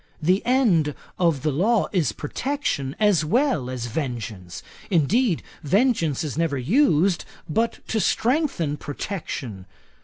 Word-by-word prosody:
The 180 +5 +2
end 195 - +3 0.2
of 165 -6 +1
law 190 - +2
is 165 - +1
protection 145 - -3
as 205 -7 +3
well 200 - +1
as 125 -2 -4
vengeance. 110 - -5 0.3
Indeed, 185 - +2 0.2
vengeance 170 - +1
is 155 0 -4
never 165 -4 +1
used 180 - +3 0.2
but 225 +8 -1
to 220 - +1
strengthen 225 - +1
protection. 135 - -5
165 Hz, 115 wpm, -24 LUFS, 140-220 Hz, 0.3 s, end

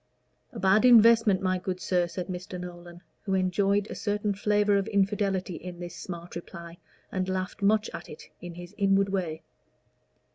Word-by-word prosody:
"A - - -10
bad 195 +4 +4
investment, 230 -4 +6
my 185 -1 +1
good 185 0 -4
sir," 180 -2 +1
said 180 +1 -5
Mr. 180 0 -6
Nolan, 175 -1 -9 0.2
who 195 -2 -1
enjoyed 195 +2 +1
a - - -6
certain 205 0 -1
flavor 205 +1 +2
of 200 +1 -1
infidelity 195 -2 0
in 180 -1 -9
this 175 0 -7
smart 170 -1 -8
reply, 170 0 -9 0.3
and 185 0 -2
laughed 185 +2 -3
much 215 +2 +3
at - - -8
it 150 - -12
in 175 -1 -8
his 175 +2 -10
inward 195 0 +3
way. 175 -5 -3
190 Hz, 170 wpm, -27 LUFS, 175-205 Hz, 0.3 s, investment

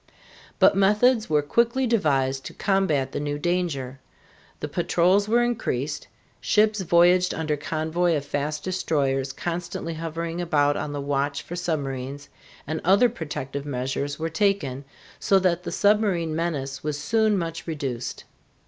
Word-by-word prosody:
But - - +5
methods 210 +4 +3
were 150 -1 +2
quickly 235 - +2
devised 135 - +1
to - - -8
combat 175 -10 +1
the - - -3
new 145 0 -2
danger. 145 -6 -2 0.6
The - - -3
patrols 180 +5 +2
were 240 +2 +4
increased, 150 - -2 0.3
ships 215 -1 +2
voyaged 180 +1 +4
under 155 -2 -1
convoy 160 +3 0
of 145 -2 -3
fast 150 +1 -3
destroyers 140 -7 0
constantly 170 +2 -4
hovering 165 +1 -4
about 145 -4 +2
on 145 - -3
the 145 - -4
watch 140 0 -1
for 175 - -7
submarines, 140 -5 -3 0.4
and 155 +2 -3
other 200 +8 +5
protective 145 - -5
measures 140 +2 -2
were 160 - -2
taken, 160 -6 0 0.3
so 195 - +3
that 180 -2 +1
the - - -5
submarine 200 -6 +2
menace 145 -5 -3
was 150 -1 -2
soon 215 +6 +2
much 165 -2 -4
reduced. 135 -7 -4
160 Hz, 140 wpm, -25 LUFS, 145-185 Hz, 0.6 s, But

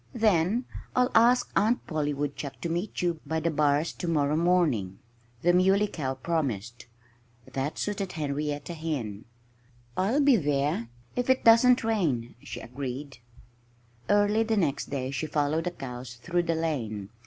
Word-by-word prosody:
"Then 215 +1 +2 0.3
I'll 250 +1 +3
ask 240 +2 +4
Aunt 225 +4 +2
Polly 150 -3 -1
Woodchuck 145 0 -4
to 170 - -2
meet 175 +3 -2
you 170 -2 0
by 160 +2 -2
the 165 +1 0
bars 150 +1 +2
to 175 - -5
morrow 150 -3 +2
morning," 155 - +2 0.5
the 175 +1 +4
Muley 190 +3 +4
Cow 135 -9 -3
promised. 125 - -3 0.6
That 135 +3 -3
suited 200 -2 -3
Henrietta 145 +1 -3
Hen. 140 -11 -4 0.7
"I'll 215 +10 +1
be 280 -4 +5
there 145 - 0 0.3
if 245 +1 -1
it 260 - +3
doesn't 235 +2 +6
rain," 160 - 0
she - - -7
agreed. 130 +2 -6 0.9
Early 205 +1 +4
the 225 -1 +1
next 150 -8 0
day 135 -2 -3
she 140 +3 -3
followed 150 +2 0
the - - +1
cows 125 -6 -8
through 175 +8 -1
the 165 - +3
lane. 115 -12 -2
155 Hz, 150 wpm, -28 LUFS, 140-190 Hz, 0.9 s, doesn't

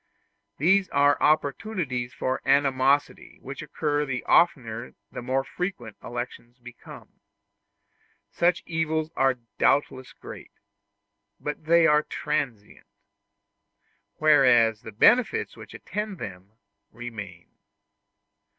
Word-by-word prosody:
These 190 +5 +3
are 145 0 +3
opportunities 140 - 0
for 130 0 -3
animosity 140 0 +1
which 140 +2 -8
occur 150 -1 -1
the 130 -4 -4
oftener 120 -8 +1 0.2
the - - -6
more 130 +2 -1
frequent 135 - -5
elections 120 0 -7
become. 120 -1 -14 1.1
Such 175 +1 +1
evils 160 -1 -2
are 135 -1 +2 0.2
doubtless 130 -2 +1
great, - - -12 0.9
but 150 +1 -6
they 170 +1 +5
are 150 -2 +5
transient; 135 -9 -4 1.3
whereas 125 -8 +4
the 110 - -9
benefits 250 - +3
which - - -12
attend 210 -2 -5
them 95 - -9 0.4
remain. 105 -7 -9
135 Hz, 95 wpm, -25 LUFS, 120-160 Hz, 1.3 s, they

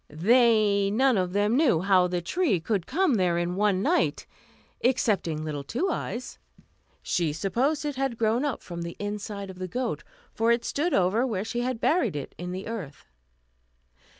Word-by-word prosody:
They 210 +3 +3
none 255 +4 +3
of 180 -2 0
them 205 +4 +1
knew 260 - +3
how 185 -1 +4
the 175 -1 -2
tree 275 - +1
could 190 +1 -2
come 370 -4 +2
there 180 -5 +2
in 175 +1 -1
one 200 -1 +1
night, 350 +5 +1 0.6
excepting 200 -11 +1
little 145 -2 -4
Two 295 - -1
Eyes. 255 -5 -5 0.6
She 170 -4 0
supposed 250 - -1
it 290 -3 -3
had 270 -3 -1
grown 230 +3 +1
up 285 -5 -2
from 170 -1 -7
the 170 0 -6
inside 205 -1 -5
of 185 - -14
the 185 - -4
goat; 250 +8 -3 0.3
for 225 +1 +2
it 235 0 +1
stood 325 +5 0
over 195 +6 +2
where 205 -4 -2
she 240 +2 -3
had 250 -1 -2
buried 250 - +1
it 145 - -5
in 180 +1 -5
the 185 +2 -5
earth. 195 -11 -7
210 Hz, 180 wpm, -26 LUFS, 180-250 Hz, 0.6 s, how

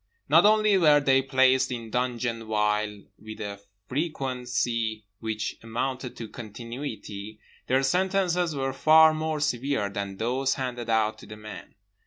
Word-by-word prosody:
Not - - +6
only 215 -2 +4
were 150 -4 +6
they 135 -2 +3
placed 130 -1 +3
in 115 -2 -5
dungeon 120 -2 -2
vile 105 -1 0 0.2
with 110 0 -10
a 100 -2 -6 0.3
frequency 125 -6 -2
which 110 -1 -3
amounted 125 +3 -4
to 115 - -6
continuity; 110 -2 -7 0.3
their 130 +2 +2
sentences 180 +1 +1
were 135 -1 -2
far 155 +3 +6
more 155 0 -2
severe 135 -6 -1
than 100 -1 -5
those 130 +5 0
handed 125 -3 -4
out 110 -1 +1
to - - -13
the 105 - -9
men. 105 0 -10
125 Hz, 140 wpm, -26 LUFS, 110-140 Hz, 0.3 s, Not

